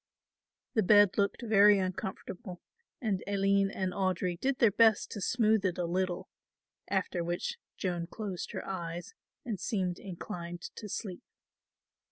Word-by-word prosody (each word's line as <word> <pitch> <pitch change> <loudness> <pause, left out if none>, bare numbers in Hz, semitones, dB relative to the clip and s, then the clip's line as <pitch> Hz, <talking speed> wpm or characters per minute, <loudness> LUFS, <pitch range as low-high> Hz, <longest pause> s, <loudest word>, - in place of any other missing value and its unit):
The 220 - +3
bed 205 0 +6
looked 200 +4 +1
very 210 -2 +6
uncomfortable 185 +1 -4 0.4
and 210 -7 -1
Aline 200 0 +3
and 190 -1 -2
Audry 185 -2 0
did 270 +3 0
their 230 -4 +5
best 220 0 +4
to 205 - -5
smooth 220 -1 +3
it 185 -3 0
a 175 - 0
little, 180 +1 -1 0.6
after 175 -2 0
which 175 - -3 0.2
Joan 175 -3 -2
closed 195 -2 -5
her - - -4
eyes 175 -2 -5 0.3
and 220 -6 -3
seemed 185 -4 -1
inclined 175 -2 -7
to 210 - -7
sleep. 185 -2 -5
195 Hz, 140 wpm, -31 LUFS, 180-210 Hz, 0.6 s, bed